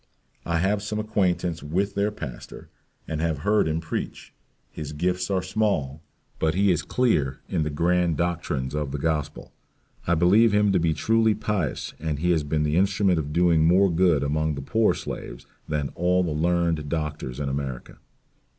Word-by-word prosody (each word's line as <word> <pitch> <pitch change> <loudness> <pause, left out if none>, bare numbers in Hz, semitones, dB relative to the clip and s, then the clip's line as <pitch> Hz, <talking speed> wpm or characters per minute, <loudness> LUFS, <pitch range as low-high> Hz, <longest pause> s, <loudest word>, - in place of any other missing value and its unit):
I 85 -1 +1
have 100 +4 +1
some 105 +1 -4
acquaintance 90 -6 0
with 95 +8 -1
their 100 +1 +1
pastor, 75 - -9 0.4
and 80 -1 -3
have 80 -4 -1
heard 105 -4 +3
him 80 +1 0
preach; 80 -1 -5 0.4
his 75 -1 -7
gifts 90 +4 -1
are 95 -2 0
small, 95 -8 -1 0.4
but 80 +1 +1
he 100 0 +3
is 85 - +1
clear 75 - 0
in - - -1
the 75 - -1
grand 85 +1 +1
doctrines 75 -6 -2
of 75 -2 -2
the 75 - -3
Gospel. 75 -1 -3 0.5
I 85 - +3
believe 100 +7 +4
him 105 -1 +3
to 95 - +3
be 80 -2 +1
truly 110 +5 +2
pious 100 -8 -2
and 80 -1 -2
he 90 +4 +1
has 80 -3 +2
been 75 +1 -1
the 75 +2 +1
instrument 95 -2 +2
of 75 -1 -4
doing 85 -1 +3
more 90 +3 +4
good 85 -4 +3
among 75 +1 0
the 70 - -6
poor 110 +9 +2
slaves - - -7 0.2
than 75 -2 -1
all 90 +1 +1
the 85 - -2
learned 80 -1 0
doctors 75 -5 -4
in 70 - -2
America." 70 -2 -5
85 Hz, 180 wpm, -25 LUFS, 75-95 Hz, 0.5 s, believe